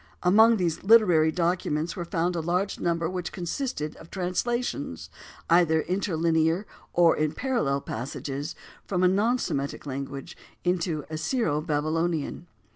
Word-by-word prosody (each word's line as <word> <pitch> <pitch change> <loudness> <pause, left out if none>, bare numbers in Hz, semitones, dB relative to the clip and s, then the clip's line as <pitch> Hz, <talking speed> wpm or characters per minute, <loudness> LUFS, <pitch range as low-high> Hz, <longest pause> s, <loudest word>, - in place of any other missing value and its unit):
Among 220 +5 +6
these 170 -4 -1
literary 185 -7 +5
documents 170 -2 -1
were 175 - -4
found 170 +1 -1
a - - 0
large 180 +4 -1
number 170 -1 0
which 180 0 -4
consisted 175 - -3
of - - -13
translations, 180 - -2 0.4
either 165 -2 +4
interlinear 170 -1 +1 0.3
or 170 -1 +5
in 155 0 0
parallel 195 - 0
passages, 135 +6 -5 0.3
from 185 -2 -1
a - - +7
non 210 +7 +2
Semitic 140 - -3
language 135 0 -6 0.3
into 170 -4 0
Assyro 160 - 0
Babylonian. 160 +2 -1
170 Hz, 125 wpm, -26 LUFS, 155-185 Hz, 0.4 s, a